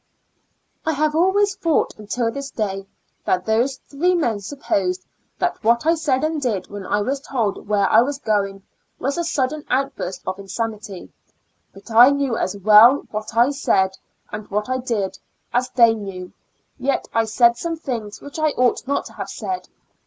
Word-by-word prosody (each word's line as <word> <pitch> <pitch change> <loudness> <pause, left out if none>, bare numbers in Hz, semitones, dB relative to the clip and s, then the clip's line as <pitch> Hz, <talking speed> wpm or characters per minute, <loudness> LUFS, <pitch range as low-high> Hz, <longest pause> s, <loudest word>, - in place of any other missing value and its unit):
I 320 - 0
have 305 +1 +1
always 385 +5 +3
thought 330 -5 +1
until 230 +2 -1
this 280 +2 -6
day 195 -4 -3 0.4
that 180 0 +1
those 235 +5 +1
three 350 +6 +1
men 235 -11 0
supposed 190 -6 -2 0.3
that 355 -8 -2
what 235 +4 +3
I 325 - +5
said 300 -5 0
and 310 -1 -1
did 210 -9 -2
when 200 -2 -7
I 205 - +1
was 270 +6 -1
told 230 -9 -2
where 205 -2 +2
I 220 - +6
was 275 +3 -1
going, 200 -6 -1 0.3
was 275 +6 -2
a - - 0
sudden 300 -2 -1
outburst 255 -8 -2
of 185 +1 -3
insanity, 205 -1 -5 0.6
but 195 +3 -14
I 240 +4 +8
knew 280 -4 0
as 200 -2 -2
well 215 +7 +7
what 215 +2 -5
I 240 +4 +5
said, 195 -9 +1 0.4
and 210 0 -7
what 210 +3 -2
I 255 0 0
did, 225 -6 -2 0.3
as 250 +1 +1
they 235 -2 +5
knew; 195 -4 -7 0.5
yet 270 +2 -1
I 225 0 +2
said 235 +2 +4
some 335 -1 -3
things 230 -9 -5
which 285 +2 -8
I 310 0 +3
ought 250 0 +1
not 280 - 0
to - - -11
have - - -6
said. 370 -1 -5
235 Hz, 175 wpm, -21 LUFS, 205-280 Hz, 0.6 s, I